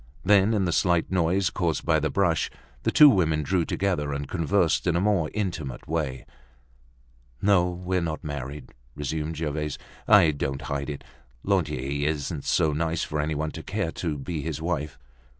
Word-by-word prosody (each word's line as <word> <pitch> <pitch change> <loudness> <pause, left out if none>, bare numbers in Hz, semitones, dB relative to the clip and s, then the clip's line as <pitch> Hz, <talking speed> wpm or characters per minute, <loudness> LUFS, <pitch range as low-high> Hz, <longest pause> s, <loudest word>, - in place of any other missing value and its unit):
Then, 100 +2 +5
in 100 -3 +1
the 85 - 0
slight 85 0 +2
noise 90 +1 +2
caused 85 -5 -1
by 80 -2 +3
the 80 +1 -1
brush, 85 -5 +1 0.3
the - - 0
two 150 - +9
women 80 - +3
drew 90 +2 +1
together, 85 -7 -1
and 70 0 -4
conversed 85 +1 +1
in 85 - +2
a - - +2
more 95 -5 +1
intimate 85 - -4
way. 75 -5 -2 1.1
"No, 95 -1 +3
we're 90 +1 -2
not 80 -2 -3
married," 70 0 -6 0.2
resumed 75 +2 -3
Gervaise. 75 -1 -2 0.3
"I 100 -7 +7
don't 70 -1 -3
hide 70 +1 -3
it. 70 - -6 0.4
Lantier 70 +3 0
isn't 75 0 -3
so 75 - +2
nice 80 +2 -1
for 75 - -3
any 75 +1 -1
one 75 +1 -2
to 80 - -7
care 100 -1 -2
to 80 -4 -3
be 75 +3 -4
his 80 -1 -4
wife. 80 -3 -3
80 Hz, 170 wpm, -26 LUFS, 75-90 Hz, 1.1 s, two